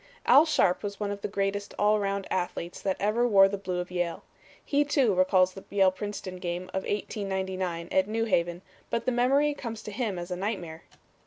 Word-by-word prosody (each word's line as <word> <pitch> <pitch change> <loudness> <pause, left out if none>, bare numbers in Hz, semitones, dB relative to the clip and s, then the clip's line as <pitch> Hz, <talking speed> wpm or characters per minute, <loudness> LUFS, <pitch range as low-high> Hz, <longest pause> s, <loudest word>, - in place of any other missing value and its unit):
Al 305 +4 +7
Sharpe 180 - +2
was 200 -1 -5
one 205 -1 -2
of 200 0 -5
the - - -2
greatest 200 0 -2
all 210 +1 +4
around 200 -1 -1
athletes 175 -1 -3
that 190 -1 -1
ever 220 +4 +2
wore 195 -4 +7
the 200 - -3
blue 190 -2 -4
of 180 +1 -5
Yale. 175 -2 -2 0.4
He, 285 0 +2
too, 275 -7 +2
recalls 185 0 +3
the 195 - -10
Yale 195 -2 +4
Princeton 190 -1 -6
game 180 0 -4
of 190 - -1
1899 190 -4 -3
at 190 0 +3
New 225 +1 -1
Haven, 175 -3 0 0.3
but 230 0 -2
the 255 - +2
memory 275 +5 +3
comes 230 -5 -6
to 210 - -7
him 210 -4 -2
as 175 +1 -6
a - - -1
nightmare. 180 -5 -4
195 Hz, 200 wpm, -28 LUFS, 185-215 Hz, 0.4 s, Al